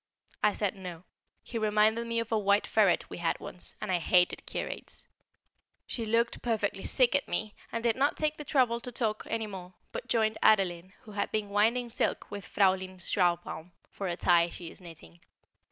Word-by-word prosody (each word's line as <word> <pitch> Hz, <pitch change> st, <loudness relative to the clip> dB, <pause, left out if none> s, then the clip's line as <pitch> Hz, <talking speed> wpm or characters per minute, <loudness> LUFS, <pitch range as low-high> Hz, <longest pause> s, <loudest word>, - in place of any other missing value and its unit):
I 210 Hz, -1 st, +4 dB
said 205 Hz, -3 st, 0 dB
No; 180 Hz, -3 st, -8 dB, 0.4 s
he 230 Hz, -, -4 dB
reminded 215 Hz, +2 st, +2 dB
me 230 Hz, 0 st, 0 dB
of 230 Hz, 0 st, -4 dB
a 220 Hz, -, +3 dB
white 200 Hz, 0 st, +3 dB
ferret 205 Hz, -5 st, +3 dB
we -, -, -8 dB
had 170 Hz, -1 st, 0 dB
once, 180 Hz, -, -8 dB
and 215 Hz, -, -3 dB
I 180 Hz, -, +2 dB
hated 180 Hz, +1 st, +2 dB
curates. -, -, -6 dB, 0.8 s
She 230 Hz, -3 st, -3 dB
looked 230 Hz, +1 st, +1 dB
perfectly 215 Hz, -4 st, -1 dB
sick 250 Hz, -2 st, +3 dB
at 285 Hz, -, +1 dB
me 215 Hz, -1 st, -2 dB, 0.2 s
and 230 Hz, 0 st, -3 dB
did 235 Hz, -1 st, +3 dB
not 280 Hz, +3 st, +1 dB
take 305 Hz, 0 st, 0 dB
the 300 Hz, -, -6 dB
trouble 255 Hz, -5 st, +2 dB
to 250 Hz, -, -8 dB
talk 220 Hz, -3 st, -2 dB
any 225 Hz, -1 st, -1 dB
more, 185 Hz, -3 st, -9 dB, 0.2 s
but -, -, -6 dB
joined 220 Hz, -1 st, +1 dB
Adeline, 185 Hz, -3 st, +3 dB
who 215 Hz, -, -13 dB
had 200 Hz, 0 st, -2 dB
been 215 Hz, -2 st, -1 dB
winding 230 Hz, +4 st, +2 dB
silk 225 Hz, -, -1 dB
with 200 Hz, -3 st, -7 dB
Fräulein 190 Hz, -1 st, +2 dB
Schlarbaum 175 Hz, -2 st, 0 dB, 0.2 s
for 195 Hz, -, -4 dB
a 175 Hz, -1 st, -2 dB
tie 175 Hz, -1 st, +4 dB
she 170 Hz, -1 st, -8 dB
is -, -, -14 dB
knitting. 85 Hz, -, -12 dB
210 Hz, 190 wpm, -30 LUFS, 180-230 Hz, 0.8 s, I